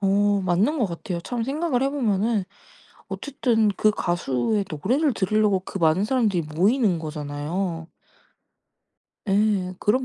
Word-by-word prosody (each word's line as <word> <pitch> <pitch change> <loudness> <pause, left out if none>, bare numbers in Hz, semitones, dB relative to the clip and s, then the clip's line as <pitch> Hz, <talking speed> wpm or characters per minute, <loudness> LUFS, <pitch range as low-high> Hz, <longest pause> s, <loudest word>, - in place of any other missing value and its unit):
어 200 +1 +2
맞는 195 - +1
것 230 - +2
같아요 175 0 -5
참 235 +6 -3
생각을 275 -1 -1
해 270 - +2
보면은 220 -6 0 0.6
어쨌든 240 -6 0
그 215 - +4
가수의 175 - -1
노래를 250 - +1
들으려고 205 0 +2
그 195 +1 -7
많은 165 +3 +3
사람들이 215 -7 +1
모이는 185 - +1
거잖아요. 160 +3 -4 1.4
예. 195 -2 +1
그런 255 +5 +2
200 Hz, 275 characters per minute, -24 LUFS, 175-230 Hz, 1.4 s, 그